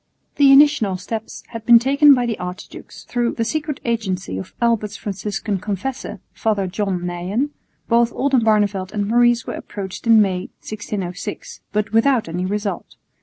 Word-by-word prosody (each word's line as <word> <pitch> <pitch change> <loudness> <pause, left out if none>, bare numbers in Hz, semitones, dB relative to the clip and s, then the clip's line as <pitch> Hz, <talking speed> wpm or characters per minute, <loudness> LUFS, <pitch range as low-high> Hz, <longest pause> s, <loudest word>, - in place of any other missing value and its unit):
The 280 -2 +6
initial 275 -9 +5
steps 220 +4 -6
had 230 -2 -7
been 235 0 +8
taken 280 +4 +5
by 245 -1 0
the 230 -2 -3
archdukes. 180 +2 -8
Through 240 -1 -1
the 230 - -1
secret 300 +1 -3
agency 195 - -2
of 95 - -9
Albert's 215 -4 0
Franciscan 205 0 -3
Confessor, 210 +4 -4
Father 210 -3 0
John 185 -1 -2
Neyen, 185 +11 -2 0.4
both 235 0 +3
Oldenbarneveldt 215 -8 +1
and 205 -1 -1
Maurice 240 +1 +3
were - - -5
approached 195 +2 -7
in 225 -1 +7
May, 190 -3 +1 0.2
1606, 210 - -6
but 210 0 -1
without 230 -1 +3
any 180 +3 -3
result. 205 +1 -4
215 Hz, 150 wpm, -20 LUFS, 195-240 Hz, 0.4 s, been